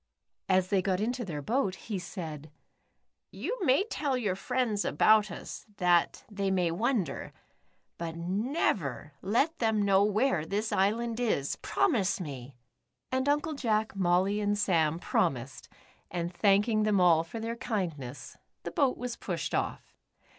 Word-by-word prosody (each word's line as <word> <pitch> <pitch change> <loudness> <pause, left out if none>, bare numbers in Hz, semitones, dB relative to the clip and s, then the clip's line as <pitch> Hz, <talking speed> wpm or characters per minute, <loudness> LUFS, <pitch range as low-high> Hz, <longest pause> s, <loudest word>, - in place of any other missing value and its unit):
As 185 -1 +3
they 195 -2 +3
got 185 -1 0
into 240 +4 -1
their 150 -8 -5
boat, 215 - 0
he 205 -2 -5
said: 160 -5 -7 0.8
"You - - -4
may 280 +2 +4
tell 290 - -1
your 210 -7 -1
friends 230 -1 -1
about 215 -1 +4
us, 175 - -8
that 175 -1 +2
they 200 -2 -2
may 180 -3 +1
wonder, 200 - -1 0.7
but 165 -1 -4
never 180 - -1
let 275 - +1
them 220 -2 +2
know 195 0 +4
w^here 210 - +1
this 210 +2 -1
island 225 +4 +1
is. 210 - 0
Promise 220 - +1
me," 135 -6 -7 0.6
and 260 +2 +1
Uncle 295 +2 +1
Jack, 220 -6 0
Molly, 190 +2 +2
and 205 0 +1
Sam 165 -6 +2
promised, 135 -7 -1 0.4
and 175 0 -3
thanking 205 +4 +3
them 210 -2 +2
all 170 -3 +5
for 175 +7 -7
their 230 +1 -3
kind 210 -9 -2
ness, 130 +1 -9 0.3
the - - -5
boat 275 -3 +2
was 245 -1 -4
pushed - - -4
off. - - -2
200 Hz, 145 wpm, -29 LUFS, 175-235 Hz, 0.8 s, all